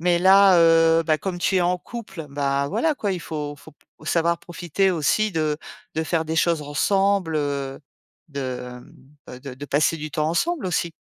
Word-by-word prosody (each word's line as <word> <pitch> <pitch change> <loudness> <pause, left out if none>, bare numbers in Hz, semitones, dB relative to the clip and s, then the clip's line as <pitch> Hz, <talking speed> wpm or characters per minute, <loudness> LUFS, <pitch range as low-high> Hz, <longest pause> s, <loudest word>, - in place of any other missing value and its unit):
Mais 175 0 +2
là, 190 0 +6
heu, 165 0 +5
bah, 155 -1 +2
comme 185 -2 -4
tu 190 +2 0
es - - +3
en 180 +1 +1
couple, 195 -10 -8
bah, 140 0 0
voilà 320 - 0
quoi, 205 -5 -1
il 180 - -4
faut 150 -2 -5
faut 145 +1 -16 0.3
savoir 170 +1 +1
profiter 175 +3 -1
aussi 180 +6 +1
de 155 -2 -1 0.4
de 160 - 0
faire 160 -1 0
des 160 +1 -3
choses 165 -1 +2
ensemble, 195 +3 +1
heu, 140 -2 -3 0.5
de, 140 -2 -6 0.9
hem, 125 - -10
de 135 -1 -8
de 140 +3 -8
passer 150 +3 +1
du 155 0 -6
temps 155 0 -1
ensemble, 290 - -1
aussi. 170 -2 -1
165 Hz, 185 wpm, -23 LUFS, 150-180 Hz, 0.9 s, là